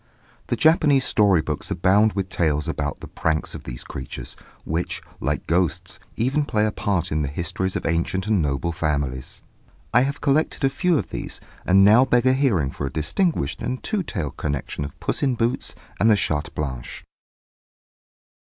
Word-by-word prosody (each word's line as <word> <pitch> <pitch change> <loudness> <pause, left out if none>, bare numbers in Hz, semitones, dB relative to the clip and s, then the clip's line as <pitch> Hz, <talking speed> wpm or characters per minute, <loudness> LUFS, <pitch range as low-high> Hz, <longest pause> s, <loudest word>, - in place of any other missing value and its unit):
The - - 0
Japanese 155 -4 +4
story 100 -6 +4
books 75 -2 -3
abound 100 +5 +3
with 95 -2 -2
tales 80 -4 0
about 75 -3 -3
the - - -7
pranks 80 -1 -1
of - - -8
these - - -6
creatures, 65 -2 -7 0.3
which, 80 +3 -2 0.2
like - - -2
ghosts, 85 -2 0 0.2
even 135 +6 +1
play 105 -6 +1
a 110 - +1
part 95 -4 -1
in 75 0 +1
the 70 - 0
histories 90 +5 -2
of - - -3
ancient 85 +3 0
and 105 -4 +2
noble 70 +3 -1
families. 70 -5 -2 0.5
I - - +6
have 140 +2 -1
collected 145 +1 +1
a 135 - +3
few 180 +3 +2
of - - -3
these, - - -5 0.3
and 95 +1 +6
now 110 +5 +7
beg 125 -2 +2
a 130 - +5
hearing 110 - +2
for 70 - -4
a - - -5
distinguished 80 - 0
and 130 - -3
two 215 -3 -1
tailed 95 - -4
connection 70 0 -3
of 70 - -8
Puss - - -2
in 135 -3 +2
Boots 115 +1 -1 0.2
and 110 - +4
the 110 - +6
Chatte 75 -5 0
Blanche. 65 -5 -5
95 Hz, 180 wpm, -23 LUFS, 75-125 Hz, 0.5 s, now